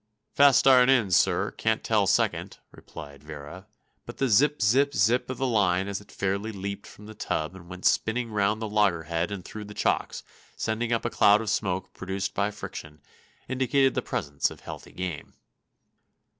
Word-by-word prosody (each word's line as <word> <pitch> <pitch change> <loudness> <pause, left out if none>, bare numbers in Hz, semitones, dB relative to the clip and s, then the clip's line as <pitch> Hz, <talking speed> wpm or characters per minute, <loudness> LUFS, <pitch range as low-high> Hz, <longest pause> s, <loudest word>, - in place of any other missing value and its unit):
"Fust 140 -2 +5
iron 130 -1 +6
in, 115 -8 +3
sir; 85 - +2
can't 110 0 -1
tell 105 -3 +2
second," - - 0
replied 70 -4 -12
Vera; 75 +4 -10 0.4
but - - -9
the 135 - 0
zip 145 +8 +3
zip 135 +7 +3
zip 115 +7 +2
of 130 - -4
the 135 - -1
line 100 -6 +2
as 100 0 -4
it 105 - -18
fairly 100 +3 -2
leaped 100 0 -6
from 105 - -14
the 110 - -10
tub 80 -5 -3
and 90 -2 -13
went 90 0 -9
spinning 115 +1 +1
round 105 +1 +1
the - - -2
loggerhead 85 -5 0
and 100 -3 -6
through 105 -1 -8
the 105 0 -11
chocks, - - -1 0.3
sending 115 +1 -2
up 115 - 0
a - - -1
cloud 105 +1 +5
of 110 -2 -2
smoke 95 -2 -2
produced 95 +1 -4
by 100 +1 0
friction, 75 -7 -9 0.5
indicated 135 +1 +2
the - - -1
presence 70 0 -2
of - - -13
healthy - - -9
game. 90 -5 -6
105 Hz, 180 wpm, -26 LUFS, 90-115 Hz, 0.5 s, iron